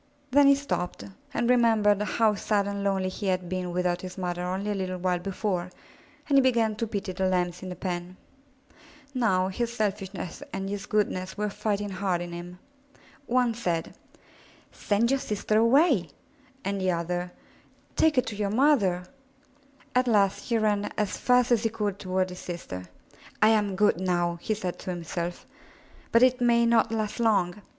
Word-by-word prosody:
Then 285 Hz, +1 st, +6 dB
he 280 Hz, -, +7 dB
stopped 275 Hz, -, -3 dB, 0.3 s
and 240 Hz, -, 0 dB
remembered 225 Hz, -4 st, +4 dB
how 215 Hz, +1 st, +2 dB
sad 200 Hz, 0 st, 0 dB
and 200 Hz, 0 st, -3 dB
lonely 190 Hz, -2 st, 0 dB
he 195 Hz, +2 st, -5 dB
had 185 Hz, -1 st, 0 dB
been 180 Hz, 0 st, -3 dB
without 180 Hz, 0 st, 0 dB
his 185 Hz, 0 st, -8 dB
mother 175 Hz, -1 st, -3 dB
only 190 Hz, +3 st, -2 dB
a -, -, +1 dB
little 185 Hz, -2 st, -3 dB
while 180 Hz, 0 st, 0 dB
before, 185 Hz, -1 st, -2 dB, 0.6 s
and 280 Hz, -2 st, +5 dB
he -, -, +6 dB
began 230 Hz, -4 st, +2 dB
to 230 Hz, -, -2 dB
pity 200 Hz, -3 st, -3 dB
the 190 Hz, +1 st, -1 dB
Lambs 180 Hz, -1 st, -1 dB
in 190 Hz, -, -6 dB
the 180 Hz, -, -5 dB
pen. 180 Hz, -1 st, -5 dB, 1.0 s
Now 190 Hz, -7 st, +2 dB
his 235 Hz, +5 st, -2 dB
selfishness 200 Hz, -2 st, -3 dB
and 195 Hz, 0 st, -4 dB
his 205 Hz, -1 st, -5 dB
goodness 190 Hz, -3 st, -1 dB
were 210 Hz, 0 st, -1 dB
fighting 205 Hz, -1 st, -2 dB
hard 190 Hz, -2 st, -1 dB
in 175 Hz, 0 st, -6 dB
him. 175 Hz, +1 st, -8 dB, 0.7 s
One 245 Hz, -1 st, +2 dB
said, 175 Hz, -8 st, -2 dB, 0.8 s
*'Send 220 Hz, +4 st, +1 dB
your 275 Hz, -, +2 dB
sister 215 Hz, -1 st, 0 dB
away," 235 Hz, -, +4 dB, 0.6 s
and 195 Hz, 0 st, -1 dB
the 185 Hz, -, +1 dB
other, 175 Hz, +1 st, -2 dB, 0.6 s
*Take 320 Hz, -2 st, +3 dB
her 255 Hz, -, +4 dB
to 225 Hz, -2 st, -6 dB
your 205 Hz, -1 st, -1 dB
mother/* 210 Hz, -7 st, +3 dB, 0.9 s
At 250 Hz, 0 st, +2 dB
last 200 Hz, -4 st, +2 dB
he 235 Hz, -, +1 dB
ran 210 Hz, -2 st, +1 dB
as 210 Hz, -3 st, 0 dB
fast 250 Hz, 0 st, +3 dB
as 235 Hz, -3 st, +4 dB
he 225 Hz, -, +1 dB
could 205 Hz, -3 st, -3 dB
toward 185 Hz, -1 st, -1 dB
his 180 Hz, -, -8 dB
sister. 95 Hz, -, -6 dB, 0.5 s
"I 215 Hz, -, +6 dB
am 210 Hz, -3 st, +2 dB
good 205 Hz, -3 st, +3 dB
now," 175 Hz, -2 st, 0 dB
he 215 Hz, -, -1 dB
said 185 Hz, -4 st, -4 dB
to -, -, -7 dB
himself, 175 Hz, 0 st, -4 dB, 0.7 s
*'but 230 Hz, +2 st, +5 dB
it 255 Hz, 0 st, +4 dB
may 235 Hz, -1 st, +4 dB
not 230 Hz, -1 st, +3 dB
last 215 Hz, 0 st, -2 dB
long. 205 Hz, -4 st, +1 dB
200 Hz, 175 wpm, -27 LUFS, 180-225 Hz, 1.0 s, he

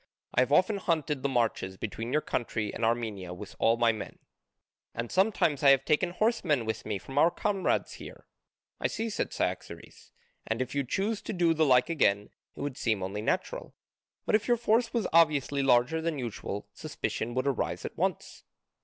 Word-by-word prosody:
I -, -, +2 dB
have 130 Hz, +2 st, +1 dB
often 185 Hz, +7 st, +4 dB
hunted 155 Hz, -6 st, -1 dB
the 140 Hz, -, 0 dB
marches 115 Hz, -7 st, 0 dB
between 115 Hz, +4 st, -5 dB
your 150 Hz, -, +1 dB
country 110 Hz, -3 st, -2 dB
and -, -, -5 dB
Armenia 110 Hz, -6 st, -1 dB
with 100 Hz, +2 st, -10 dB
all 115 Hz, +1 st, +3 dB
my 120 Hz, -1 st, +4 dB
men, 110 Hz, -3 st, -7 dB, 0.8 s
and 115 Hz, 0 st, -4 dB
sometimes 185 Hz, -7 st, +2 dB
I 140 Hz, -, +6 dB
have 135 Hz, 0 st, +5 dB
taken 155 Hz, +4 st, +2 dB
horsemen 175 Hz, -, +1 dB
with 110 Hz, 0 st, -4 dB
me 105 Hz, -2 st, -1 dB
from 135 Hz, +9 st, -3 dB
our 165 Hz, -, +6 dB
comrades 195 Hz, +1 st, -1 dB
here." -, -, -11 dB, 0.5 s
"I -, -, +1 dB
see," 225 Hz, 0 st, -3 dB
said -, -, -2 dB
Cyaxares, -, -, -5 dB, 0.4 s
"and 110 Hz, +1 st, -1 dB
if 130 Hz, 0 st, -3 dB
you 140 Hz, -1 st, 0 dB
chose 200 Hz, -, -1 dB
to -, -, -5 dB
do 175 Hz, -3 st, +3 dB
the 160 Hz, -1 st, +2 dB
like 125 Hz, +4 st, +4 dB
again 105 Hz, -10 st, +1 dB, 0.2 s
it -, -, -8 dB
would 140 Hz, -2 st, -4 dB
seem 110 Hz, -5 st, 0 dB
only 100 Hz, +3 st, -3 dB
natural, 110 Hz, -, -2 dB, 0.5 s
but -, -, -1 dB
if 215 Hz, 0 st, +3 dB
your 240 Hz, -1 st, +3 dB
force 230 Hz, +1 st, +2 dB
was 235 Hz, -3 st, 0 dB
obviously 150 Hz, -4 st, +3 dB
larger 130 Hz, +4 st, +3 dB
than 165 Hz, -2 st, -2 dB
usual, 110 Hz, -4 st, -5 dB
suspicion 120 Hz, +2 st, -4 dB
would 130 Hz, +1 st, 0 dB
arise 140 Hz, -3 st, -1 dB
at -, -, -6 dB
once." -, -, -2 dB
135 Hz, 190 wpm, -29 LUFS, 115-170 Hz, 0.8 s, I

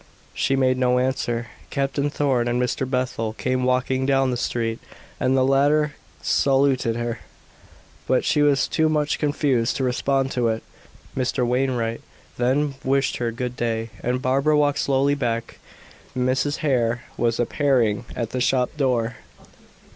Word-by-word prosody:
She 135 Hz, -, +1 dB
made 130 Hz, -1 st, +2 dB
no 125 Hz, -1 st, +3 dB
answer. 125 Hz, -2 st, -1 dB, 0.2 s
Captain 140 Hz, +1 st, -1 dB
Thorn 135 Hz, -5 st, 0 dB
and 120 Hz, +1 st, 0 dB
Mr. 125 Hz, +1 st, -1 dB
Bethel 125 Hz, -4 st, -1 dB
came 130 Hz, +2 st, -1 dB
walking 130 Hz, +1 st, +1 dB
down 135 Hz, -1 st, +2 dB
the -, -, -1 dB
street, 115 Hz, -1 st, -2 dB, 0.4 s
and 130 Hz, +1 st, +2 dB
the 130 Hz, -, +3 dB
latter 145 Hz, +3 st, +3 dB, 0.3 s
saluted 135 Hz, -4 st, +2 dB
her, 120 Hz, 0 st, -3 dB, 0.9 s
but 130 Hz, -, +2 dB
she 150 Hz, -, +2 dB
was 145 Hz, -2 st, +3 dB
too 160 Hz, 0 st, +1 dB
much 150 Hz, -1 st, 0 dB
confused 140 Hz, -5 st, +1 dB
to 135 Hz, -, -1 dB
respond 135 Hz, +1 st, 0 dB
to 120 Hz, -2 st, +1 dB
it. 110 Hz, 0 st, -1 dB, 0.5 s
Mr. 130 Hz, -1 st, 0 dB
Wainwright 120 Hz, -2 st, 0 dB, 0.4 s
then 135 Hz, +4 st, +1 dB
wished 135 Hz, +1 st, +1 dB
her 120 Hz, -1 st, -1 dB
good 125 Hz, +1 st, -4 dB
day, 115 Hz, -2 st, -2 dB
and 125 Hz, +1 st, -1 dB
Barbara 140 Hz, +4 st, +2 dB
walked 145 Hz, -1 st, +2 dB
slowly 140 Hz, +1 st, +2 dB
back. 115 Hz, -4 st, -3 dB, 0.6 s
Mrs. 130 Hz, +4 st, +1 dB
Hare 120 Hz, -4 st, +1 dB
was 115 Hz, -1 st, 0 dB
appearing 120 Hz, -3 st, +1 dB
at 115 Hz, -2 st, -3 dB
the 130 Hz, -, -2 dB
shop 125 Hz, +1 st, +1 dB
door. 125 Hz, -4 st, 0 dB
130 Hz, 145 wpm, -23 LUFS, 120-135 Hz, 0.9 s, no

